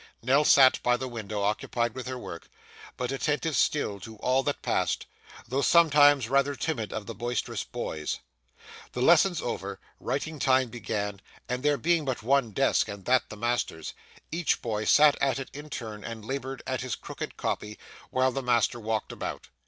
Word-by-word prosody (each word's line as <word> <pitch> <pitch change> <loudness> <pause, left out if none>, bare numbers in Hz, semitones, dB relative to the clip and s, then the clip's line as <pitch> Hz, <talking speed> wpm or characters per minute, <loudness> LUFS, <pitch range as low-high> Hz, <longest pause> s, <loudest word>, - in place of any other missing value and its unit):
Nell 135 +5 +4
sat 135 -3 +6
by 125 0 +3
the 130 - -4
window 110 -4 -4
occupied 115 +3 0
with 130 0 -6
her 130 0 -4
work, 85 -8 -8 0.5
but 125 0 -2
attentive 150 +3 -1
still 105 -9 +1
to 110 +4 -9
all 130 +5 +1
that 145 +1 -3
passed, - - 0 0.4
though 130 +4 0
sometimes 145 -6 +5
rather 140 +2 +2
timid 125 -10 -2
of 110 -2 -4
the - - -6
boisterous 120 -1 -3
boys. 75 -1 -4 0.8
The 125 - -3
lessons 170 +3 +5
over, 100 -4 -4 0.2
writing 155 -1 -3
time 130 -2 +3
began; 105 -4 -4 0.3
and 125 0 -2
there 145 0 +2
being 170 0 +2
but 130 -5 -3
one 135 0 +3
desk 105 - +2
and 100 -2 -8
that 125 -1 +2
the 105 - -8
master's, 120 -8 -2 0.4
each 165 +1 0
boy 110 -3 -2
sat 150 -1 +5
at 135 -1 +2
it 135 - -6
in 150 +2 -9
turn 110 -6 -6
and 115 -2 -7
laboured 135 +1 -4
at 130 -1 -2
his 130 -1 -3
crooked - - -7
copy, 105 0 -3 0.3
while 130 0 +2
the 135 - -3
master 120 -1 +2
walked 110 -1 -2
about. - - -6
125 Hz, 175 wpm, -28 LUFS, 110-140 Hz, 0.8 s, sat